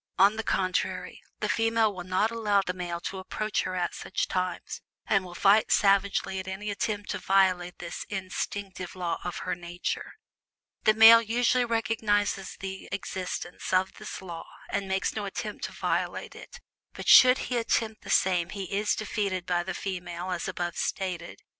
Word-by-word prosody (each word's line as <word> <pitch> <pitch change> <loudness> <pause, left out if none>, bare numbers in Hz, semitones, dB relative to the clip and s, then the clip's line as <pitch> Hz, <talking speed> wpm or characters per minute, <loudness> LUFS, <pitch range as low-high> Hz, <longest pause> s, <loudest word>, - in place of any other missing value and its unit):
On 200 +3 +6
the 220 - -2
contrary, 185 -3 -1 0.2
the - - +1
female 225 -1 +2
will 180 -2 -6
not 185 +5 +1
allow 210 -3 +2
the 180 - -1
male 175 -2 -4
to 190 - -5
approach 210 +2 -2
her 185 - -3
at 180 -1 -1
such - - -2
times, 185 -1 -3 0.2
and 195 -2 +2
will 175 -1 -10
fight 200 +4 +4
savagely 195 -1 +3
at 190 - -7
any 200 +2 -4
attempt 205 0 -2
to 205 - -3
violate 185 -2 +2
this 170 -1 -6
instinctive 190 -1 -4
law 175 -2 -2
of 175 - -4
her 185 - 0
nature. 175 0 -4 0.7
The 215 - +5
male 225 +1 +10
usually 245 +2 +2
recognizes 220 -4 0
the 190 0 -6
existence 185 -2 -4
of 185 0 +2
this - - -7
law, 170 -3 -7 0.2
and 195 - -1
makes 190 0 0
no 210 -2 -3
attempt 195 - -4
to - - -6
violate - - -2
it, - - -12 0.3
but - - -8
should 255 0 +9
he 250 - -2
attempt 225 -1 0
the - - -11
same 180 -2 +2
he 195 -1 -5
is 210 +1 +1
defeated 200 -4 -2
by 175 -1 +1
the 190 +2 -4
female 180 -1 -4
as 175 -1 -2
above 175 -1 -3
stated. 180 -3 -3
190 Hz, 170 wpm, -28 LUFS, 180-210 Hz, 0.7 s, male